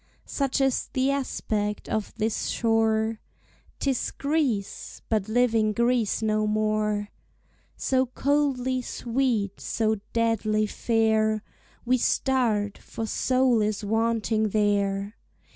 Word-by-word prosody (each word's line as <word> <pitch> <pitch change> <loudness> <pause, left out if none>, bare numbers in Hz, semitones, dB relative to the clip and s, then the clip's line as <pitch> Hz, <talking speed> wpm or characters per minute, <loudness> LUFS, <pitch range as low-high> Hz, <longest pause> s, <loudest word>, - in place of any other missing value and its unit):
Such 275 -2 -1
is 270 -2 +1
the 260 +1 +2
aspect 210 -6 -2
of 215 -2 -2
this 220 +1 -1
shore; 225 -1 +1 0.6
'Tis 270 -3 0
Greece, 280 -9 -2
but 215 -2 0
living 225 -2 +2
Greece 235 -2 +1
no 215 0 +1
more! 210 -1 0 0.7
So 260 -1 +1
coldly 260 -1 0
sweet, 235 -5 -1
so 220 -1 0
deadly 220 -2 +1
fair, 220 -1 +1 0.4
We 255 +1 +2
start, 225 -7 +1
for 225 - -6
soul 255 0 +2
is 210 0 -1
wanting 220 0 +1
there. 200 0 0
225 Hz, 105 wpm, -26 LUFS, 215-250 Hz, 0.7 s, the